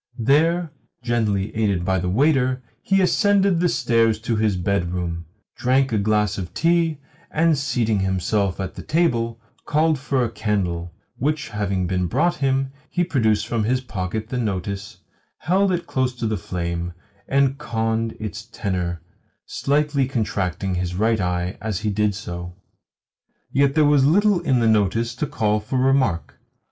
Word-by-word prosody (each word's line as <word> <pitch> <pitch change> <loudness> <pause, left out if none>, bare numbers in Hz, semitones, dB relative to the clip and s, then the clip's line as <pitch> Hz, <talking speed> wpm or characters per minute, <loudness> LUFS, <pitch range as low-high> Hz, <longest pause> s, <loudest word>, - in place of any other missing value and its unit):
There, 160 +7 +2 0.3
gently 110 -5 0
aided 100 -5 0
by 95 0 +1
the 90 +1 -2
waiter, 130 - +2 0.2
he 195 0 +2
ascended 195 -1 +3
the 175 0 +2
stairs 115 -5 +2
to 115 0 -1
his 105 -3 +1
bedroom, 85 -2 -2 0.3
drank 130 +1 +2
a 110 - +1
glass 105 -1 +1
of 90 -2 -7
tea, 165 -2 +2 0.3
and, 160 0 +3
seating 120 -7 0
himself 95 +1 0
at 95 -1 -4
the - - -8
table, 115 -9 0 0.3
called 155 0 +2
for 135 -3 0
a 115 - -4
candle; 90 -6 -2 0.3
which 150 +2 -1
having 100 -3 -1
been 90 0 0
brought 170 - +1
him, 135 -1 0 0.2
he 175 - 0
produced 110 - +1
from 115 -1 -1
his 125 +3 +1
pocket 110 -2 -4
the 125 - -2
notice, 100 -2 -3 0.4
held 190 +3 +2
it 175 -1 -1
close 130 -1 -1
to 120 - -4
the 110 -1 0
flame, 85 -2 -4 0.3
and 140 0 +2
conned 115 -3 -1
its 105 -2 -6
tenour 90 -6 -3 0.4
slightly 145 -1 0
contracting 100 -6 -2
his 90 0 -2
right 110 +3 +2
eye 90 0 -2
as 110 -2 -3
he 105 -1 0
did 105 0 +1
so. 90 -3 -6 1.0
Yet 140 +1 +2
there 155 -1 +5
was 145 -2 +4
little 195 +6 +4
in 130 -8 +1
the 115 - +3
notice 110 +2 +2
to 145 +5 -3
call 105 -4 0
for 105 +5 -3
remark. 130 -9 +1
115 Hz, 155 wpm, -22 LUFS, 95-140 Hz, 1.0 s, there